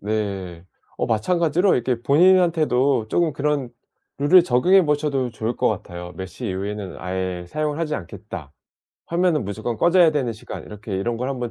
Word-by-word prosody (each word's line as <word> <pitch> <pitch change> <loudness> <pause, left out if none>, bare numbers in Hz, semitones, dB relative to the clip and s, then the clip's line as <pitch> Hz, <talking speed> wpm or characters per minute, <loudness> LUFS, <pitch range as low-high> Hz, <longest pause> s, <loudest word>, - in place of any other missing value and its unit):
네. 100 -5 -3 0.3
어 - - -1
마찬가지로 170 - +2
이렇게 120 -1 -1
본인한테도 150 -6 +3
쪼금 170 -3 +1
그런 145 -2 -1 0.5
룰을 170 +6 +6
적용해 180 +8 +4
보셔도 145 -4 0
좋을 115 +1 -3
것 - - +2
같아요. 90 0 -5
'몇 95 - -5
시 110 +7 -7
이후에는 100 0 -4
아예 90 0 -3
사용을 155 - -2
하지 155 -2 -1
않겠다. 75 - -8 0.5
화면은 170 -6 +1
무조건 110 +4 -4
꺼져야 175 - +5
되는 135 -6 -1
시간.' 110 - -9
이렇게 105 -1 -7
이런 115 +5 -2
걸 125 +3 -3
한번 125 -3 -3
125 Hz, 365 characters per minute, -22 LUFS, 105-155 Hz, 0.5 s, 룰을